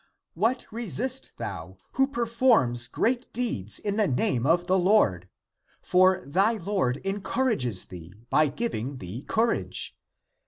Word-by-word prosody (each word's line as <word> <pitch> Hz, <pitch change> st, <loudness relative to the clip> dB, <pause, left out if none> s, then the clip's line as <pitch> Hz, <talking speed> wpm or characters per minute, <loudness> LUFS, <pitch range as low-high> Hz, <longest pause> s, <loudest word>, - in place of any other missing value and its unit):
What 225 Hz, +9 st, 0 dB
restest 240 Hz, +4 st, -2 dB
thou, 95 Hz, -1 st, -6 dB
who 270 Hz, +1 st, +2 dB
per 240 Hz, -4 st, -2 dB
forms 225 Hz, -, +3 dB
great 245 Hz, -, -1 dB
deeds 110 Hz, -, -1 dB
in 205 Hz, 0 st, -3 dB
the 215 Hz, -, +3 dB
name 125 Hz, -1 st, 0 dB
of 175 Hz, +2 st, +3 dB
the 185 Hz, +1 st, +2 dB
Lord? 110 Hz, -, +2 dB, 0.5 s
For 185 Hz, 0 st, +3 dB
thy 195 Hz, +10 st, +2 dB
Lord 190 Hz, -, -1 dB
encourages 195 Hz, -, 0 dB
thee, 90 Hz, 0 st, -11 dB, 0.2 s
by 155 Hz, -, +4 dB
giving 140 Hz, -, -3 dB
thee 95 Hz, +4 st, -7 dB
courage. 225 Hz, +8 st, 0 dB
185 Hz, 130 wpm, -26 LUFS, -, 0.5 s, by